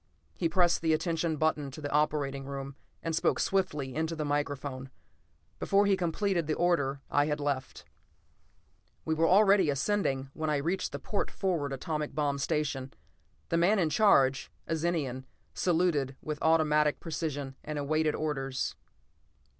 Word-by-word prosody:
He 170 Hz, -, 0 dB
pressed 175 Hz, +1 st, +3 dB
the 160 Hz, -1 st, +2 dB
attention 165 Hz, 0 st, 0 dB
button 150 Hz, -2 st, 0 dB
to 135 Hz, -, -10 dB
the 145 Hz, -1 st, -5 dB
operating 145 Hz, -2 st, 0 dB
room 140 Hz, 0 st, -6 dB, 0.3 s
and 165 Hz, -1 st, -1 dB
spoke -, -, +1 dB
swiftly 150 Hz, -9 st, 0 dB
into 160 Hz, +3 st, -2 dB
the 155 Hz, -1 st, -3 dB
microphone; 145 Hz, -2 st, -3 dB, 0.7 s
before 200 Hz, +1 st, +3 dB
he 200 Hz, -1 st, +4 dB
completed 175 Hz, -1 st, 0 dB
the 155 Hz, -, 0 dB
order 145 Hz, -6 st, +1 dB
I 145 Hz, 0 st, +3 dB
had 150 Hz, 0 st, -1 dB
left. 140 Hz, -2 st, -3 dB, 1.2 s
We 160 Hz, -, +1 dB
were 165 Hz, +1 st, +2 dB
already 195 Hz, -3 st, +5 dB
ascending 140 Hz, -3 st, 0 dB
when 155 Hz, -1 st, -2 dB
I 150 Hz, -, +2 dB
reached 170 Hz, +7 st, -1 dB
the -, -, -4 dB
port 205 Hz, -, -2 dB
forward 170 Hz, -8 st, -1 dB
atomic 150 Hz, +2 st, -3 dB
bomb 145 Hz, -2 st, 0 dB
station. 135 Hz, -2 st, -1 dB, 0.6 s
The 165 Hz, -, +1 dB
man 185 Hz, +6 st, +4 dB
in 165 Hz, -5 st, +1 dB
charge, 140 Hz, -9 st, +4 dB, 0.2 s
a 165 Hz, -, -1 dB
Zenian, 150 Hz, -6 st, -2 dB, 0.3 s
saluted 160 Hz, -7 st, +1 dB
with 150 Hz, -1 st, -5 dB
automatic 150 Hz, -2 st, +3 dB
precision 145 Hz, -5 st, -4 dB
and 150 Hz, 0 st, -5 dB
awaited 155 Hz, +2 st, +1 dB
orders. 135 Hz, -4 st, -2 dB
155 Hz, 150 wpm, -30 LUFS, 140-170 Hz, 1.2 s, already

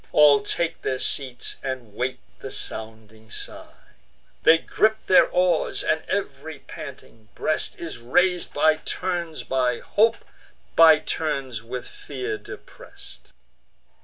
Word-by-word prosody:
All 145 Hz, -2 st, +6 dB
take 170 Hz, -1 st, -2 dB
their 130 Hz, -, -1 dB
seats, 130 Hz, -1 st, -3 dB
and 130 Hz, -6 st, -5 dB
wait 130 Hz, +3 st, -3 dB, 0.2 s
the -, -, -7 dB
sounding 110 Hz, 0 st, -5 dB
sign: -, -, -7 dB, 0.7 s
They 160 Hz, -, +7 dB
gripe 220 Hz, +6 st, +1 dB
their 185 Hz, -, +6 dB
oars; 180 Hz, -2 st, +1 dB
and 160 Hz, -, +1 dB
ev'ry 155 Hz, -5 st, -3 dB
panting 110 Hz, -4 st, -11 dB
breast 155 Hz, -, -1 dB
Is 165 Hz, -7 st, -6 dB
rais'd 180 Hz, +9 st, +1 dB
by 155 Hz, +1 st, +3 dB
turns 175 Hz, -1 st, -4 dB
with 125 Hz, -2 st, 0 dB
hope, 225 Hz, +2 st, +3 dB, 0.6 s
by 160 Hz, -1 st, +8 dB
turns 135 Hz, -7 st, -3 dB
with 120 Hz, +2 st, -6 dB
fear 125 Hz, -6 st, -5 dB
depress'd. -, -, -13 dB
140 Hz, 120 wpm, -24 LUFS, 125-165 Hz, 0.7 s, by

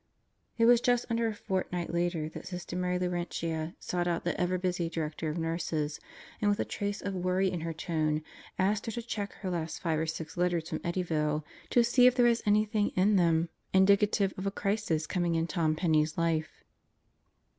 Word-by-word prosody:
It 230 Hz, -, +4 dB
was 240 Hz, 0 st, +6 dB
just 245 Hz, -1 st, +2 dB
under 230 Hz, 0 st, +1 dB
a 220 Hz, -, -1 dB
fortnight 180 Hz, -3 st, -3 dB
later 170 Hz, -2 st, 0 dB
that -, -, -9 dB
Sister 180 Hz, -1 st, -6 dB
Mary 180 Hz, 0 st, 0 dB
Laurentia 170 Hz, -2 st, -2 dB
sought 175 Hz, -1 st, -2 dB
out 170 Hz, -1 st, -1 dB
the 175 Hz, -, -1 dB
ever 180 Hz, +1 st, +1 dB
busy 180 Hz, -2 st, -1 dB
Director 160 Hz, -1 st, -3 dB
of 155 Hz, -, -3 dB
Nurses 165 Hz, -2 st, -2 dB, 0.4 s
and 210 Hz, -, +3 dB
with 205 Hz, -, +1 dB
a -, -, +1 dB
trace 205 Hz, 0 st, -3 dB
of 200 Hz, -, -2 dB
a -, -, -3 dB
worry 185 Hz, +1 st, +1 dB
in 175 Hz, -, -3 dB
her 165 Hz, 0 st, -3 dB
tone 155 Hz, -2 st, -1 dB, 0.3 s
asked 205 Hz, +3 st, +1 dB
her -, -, -1 dB
to 235 Hz, -, -4 dB
check 210 Hz, -3 st, -4 dB
her 190 Hz, -3 st, -5 dB
last 165 Hz, -2 st, -3 dB
five 160 Hz, -3 st, 0 dB
or 160 Hz, -, -1 dB
six 160 Hz, +1 st, -5 dB
letters 175 Hz, -2 st, 0 dB
from -, -, -2 dB
Eddyville 155 Hz, -4 st, -1 dB, 0.3 s
to 240 Hz, -, +4 dB
see 245 Hz, +2 st, +5 dB
if 250 Hz, -, +4 dB
there 245 Hz, -1 st, +4 dB
was 235 Hz, -1 st, +3 dB
anything 210 Hz, 0 st, +3 dB
in 200 Hz, +3 st, +4 dB
them 165 Hz, -2 st, +3 dB, 0.2 s
indicative 200 Hz, +1 st, +4 dB
of 195 Hz, -, -2 dB
a -, -, +3 dB
crisis 195 Hz, -6 st, -1 dB
coming 175 Hz, 0 st, 0 dB
in 165 Hz, 0 st, +1 dB
Tom 160 Hz, -1 st, 0 dB
Penney's 155 Hz, -2 st, +1 dB
life. 165 Hz, -1 st, -1 dB
180 Hz, 200 wpm, -30 LUFS, 165-200 Hz, 0.4 s, was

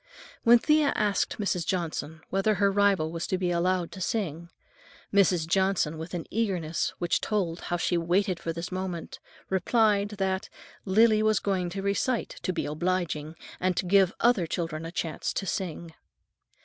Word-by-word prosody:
When 235 Hz, +1 st, +7 dB
Thea 300 Hz, +3 st, +3 dB
asked 205 Hz, -2 st, 0 dB
Mrs. 195 Hz, -4 st, -1 dB
Johnson 160 Hz, -3 st, -3 dB
whether 195 Hz, +3 st, +2 dB
her 200 Hz, +1 st, +3 dB
rival 195 Hz, -5 st, +2 dB
was 165 Hz, 0 st, -4 dB
to 185 Hz, -, 0 dB
be 180 Hz, -1 st, 0 dB
allowed 175 Hz, 0 st, 0 dB
to 190 Hz, -, -9 dB
sing, 170 Hz, -5 st, -2 dB, 0.6 s
Mrs. 185 Hz, -4 st, +4 dB
Johnson, 190 Hz, -3 st, +1 dB
with 165 Hz, +3 st, -6 dB
an 170 Hz, -, -4 dB
eagerness 185 Hz, -8 st, -1 dB
which 175 Hz, -, 0 dB
told 185 Hz, -6 st, -1 dB
how 175 Hz, -, -2 dB
she 175 Hz, -, -1 dB
had 170 Hz, -1 st, 0 dB
waited 185 Hz, 0 st, +1 dB
for 165 Hz, -, -3 dB
this 170 Hz, +2 st, -5 dB
moment, 185 Hz, -2 st, -5 dB, 0.3 s
replied 205 Hz, +1 st, +2 dB
that 190 Hz, -1 st, -1 dB, 0.4 s
"Lily 215 Hz, +2 st, +4 dB
was 215 Hz, -2 st, +3 dB
going 185 Hz, -2 st, -1 dB
to 195 Hz, +2 st, -5 dB
recite 210 Hz, +5 st, -1 dB
to 185 Hz, -, -1 dB
be 180 Hz, -, -2 dB
obliging, 160 Hz, -1 st, -2 dB, 0.2 s
and 185 Hz, -1 st, 0 dB
to -, -, 0 dB
give 190 Hz, 0 st, +4 dB
other 230 Hz, -8 st, +3 dB
children 165 Hz, -1 st, -3 dB
a -, -, -7 dB
chance 165 Hz, -3 st, -3 dB
to 195 Hz, -, -2 dB
sing." 170 Hz, -3 st, -4 dB
185 Hz, 170 wpm, -27 LUFS, 170-200 Hz, 0.6 s, When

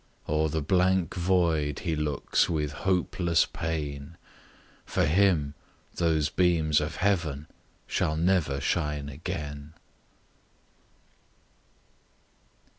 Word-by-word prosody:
O'er 80 Hz, +1 st, +1 dB
the 80 Hz, 0 st, -2 dB
blank 90 Hz, +1 st, +2 dB
void 85 Hz, -5 st, +1 dB
he 80 Hz, -2 st, -1 dB
looks 75 Hz, -2 st, 0 dB
with 75 Hz, -3 st, -1 dB
hopeless 85 Hz, +1 st, +1 dB
pain; 75 Hz, -1 st, -5 dB, 0.7 s
For -, -, 0 dB
him 80 Hz, -4 st, +2 dB, 0.4 s
those 80 Hz, -3 st, +2 dB
beams 80 Hz, -3 st, +2 dB
of 75 Hz, -, -4 dB
heaven 85 Hz, -7 st, 0 dB, 0.4 s
shall 75 Hz, -, 0 dB
never 80 Hz, -5 st, +1 dB
shine 75 Hz, -1 st, -1 dB
again. 75 Hz, -1 st, -6 dB
80 Hz, 90 wpm, -27 LUFS, 75-90 Hz, 0.7 s, blank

